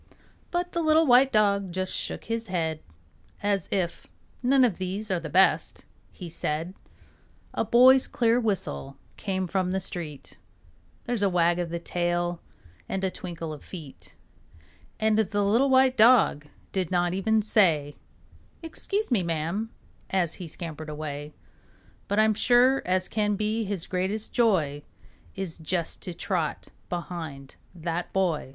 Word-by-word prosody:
But 355 0 -2
the 340 - -1
little 315 0 +4
white 260 0 +6
dog 200 -3 +2
just 185 +1 -2
shook - - -3
his 230 0 -3
head 165 -4 -1 0.6
As 200 -3 0
if 180 -3 -2 0.3
"None 260 +1 +4
of 210 -8 -1
these 195 +3 -3
are 180 - +1
best," 170 +4 +2 0.3
he 180 - -9
said. 165 +1 -3 0.8
A - - 0
boy's 255 +4 +6
clear 235 0 +2
whistle 195 - -3 0.2
came 190 -2 -2
from 185 0 -1
the 190 +1 0
street; 165 -6 -6 0.7
There's 240 -3 -2
a 200 - +3
wag 175 -1 +2
of 175 -1 -2
the 170 - -3
tail 175 0 -1 0.5
and 195 - -2
a 190 - 0
twinkle 170 -3 -6
of 150 - -10
feet, 155 -7 -11 0.8
And 220 0 +2
the 205 -1 +1
little 230 +7 +3
white 260 -1 +4
dog 220 -10 +5 0.2
did 185 -3 -1
not 175 -1 +1
even 215 +3 +1
say, 160 -9 +2 0.7
"Excuse 395 +3 -3
me, 225 -6 +3
ma'am," 170 +6 -2 0.4
as 180 -4 0
he 175 - -5
scampered 160 -1 -7
away; 150 -1 -5 0.8
But 205 - -1
I'm 215 0 +4
sure 250 +4 +4
as 185 0 +1
can 210 -1 0
be 215 +2 -1
his 195 -4 -3
greatest 195 +4 -2
joy 165 -12 +2 0.5
Is 190 -4 -5
just 170 +1 -3
to 180 - -6
trot 170 -5 -2 0.2
behind 160 -6 -6 0.2
that 170 +1 -3
boy. 180 -8 0
185 Hz, 145 wpm, -26 LUFS, 170-220 Hz, 0.8 s, white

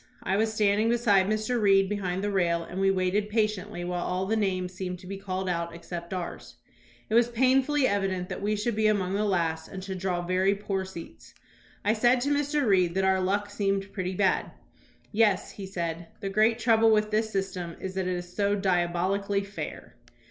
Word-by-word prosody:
I 190 - 0
was 220 +2 +1
standing 215 0 +2
beside 210 -5 +3
Mr. 215 +3 0
Reed 195 -1 +5
behind 190 -2 -2
the 205 - 0
rail, 170 -3 +1
and 180 +3 -5
we 195 - +4
waited 195 +2 +1
pa 220 +1 +3
tiently 200 -4 -3
while 175 0 -2
all 185 +1 -1
the 220 +3 0
names 185 -4 -1
seemed 180 0 -4
to 180 - -15
be 195 +2 -6
called 190 -1 -3
out 170 -1 -2
except 170 +1 -7
ours. 180 -2 -6 0.5
It - - -5
was 235 +1 +5
painfully 265 +4 +3
evident 195 -3 -1
that - - -6
we 210 +1 0
should 210 +2 -1
be 215 0 +2
among 195 -3 +1
the 210 +2 +1
last 165 -5 0
and 190 -1 -8
should 190 -1 -5
draw 180 -1 -1
very 185 +2 +2
poor 195 -1 -3
seats. 180 -3 -11 0.5
I 210 - +4
said 240 +3 +3
to 285 +3 +1
Mr. 290 0 +1
Reed 185 -5 +3
that 190 0 +2
our 190 0 +3
luck 205 +2 -1
seemed 195 -1 -1
pretty 185 -1 -3
bad. 190 0 +1 0.6
"Yes," 215 -2 +2
he 195 -2 -8
said, 170 -2 -4
"the 200 -3 -3
great 215 +3 +3
trouble 225 -1 +4
with 215 -1 +2
this 220 +1 +1
system 185 -4 -3
is 190 - -5
that 190 -1 -2
it 185 - 0
is 175 0 -9
so 205 0 +2
diabolically 190 +1 0
fair." 185 -10 -8
195 Hz, 205 wpm, -27 LUFS, 185-215 Hz, 0.6 s, Reed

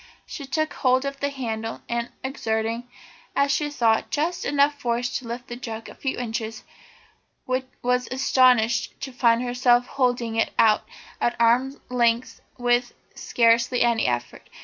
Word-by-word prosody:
She 280 -4 -8
took 310 +3 -1
hold 260 +1 +2
of 275 0 -4
the 285 - 0
handle, 225 -5 -5
and 235 0 -2
exerting, 230 -2 -2 0.5
as 280 0 +3
she 295 +1 0
thought, 230 -6 +1
just 330 +4 -1
enough 285 0 +2
force 245 0 -1
to 250 - -11
lift 240 +1 -5
the 240 - -7
jug 225 -2 -7
a - - -10
few 265 - -3
inches, 225 -2 -4 0.8
was 255 -1 -1
astonished 250 -3 +3
to 270 - -5
find 240 -1 +3
herself 245 0 +3
holding 245 -4 0
it 225 - +1
out 215 -1 +4 0.4
at 240 - +1
arm's 250 +4 +3
length 235 -1 +1 0.2
with 245 0 +1 0.2
scarcely 235 +1 +2
any 235 -2 +2
effort. 120 -1 -3
245 Hz, 150 wpm, -24 LUFS, 230-260 Hz, 0.8 s, out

